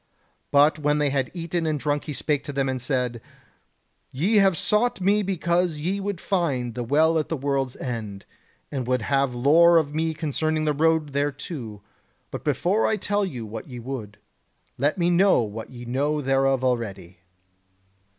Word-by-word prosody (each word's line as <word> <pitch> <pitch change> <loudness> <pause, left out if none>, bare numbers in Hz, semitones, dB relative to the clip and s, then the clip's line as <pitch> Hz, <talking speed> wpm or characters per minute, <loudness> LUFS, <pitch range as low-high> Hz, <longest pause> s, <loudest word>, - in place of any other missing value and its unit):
But 145 +2 +4
when 150 0 +1
they 145 -2 +1
had 135 -2 0
eaten 170 -1 -3
and 155 -2 0
drunk 145 +1 -1
he 150 - -4
spake 145 0 -1
to 145 - -4
them 135 -1 -1
and 130 -1 -2
said: 125 -3 -1 0.9
"Ye 185 - +1
have 195 -4 +4
sought 220 +7 +1
to 185 - -8
me 205 +2 +3
because 175 -3 0
ye 185 +6 -1
would 200 -2 -3
find 140 - -1
the 120 - -4
Well 160 +6 +3
at 155 - -3
the 160 - -1
World's 135 -2 -1
End, 110 -6 -5 0.5
and 130 -4 -3
would 125 -2 0
have 135 0 +1
lore 165 +7 +5
of 150 -3 +1
me 160 +1 -1
concerning 155 0 -1
the 150 - +2
road 160 -1 +1
thereto; 140 - -4 0.5
but - - -6
before 200 +5 +1
I 220 - +1
tell 205 +1 0
you 125 - -4
what 110 +5 -8
ye 125 - -8
would, 115 -4 -6 0.6
let 145 +8 0
me 175 -1 +2
know 185 -6 +4
what 110 +1 -7
ye 120 -1 -10
know 145 +5 0
thereof 135 -1 +1
already." 100 -8 -2
145 Hz, 180 wpm, -24 LUFS, 125-165 Hz, 0.9 s, lore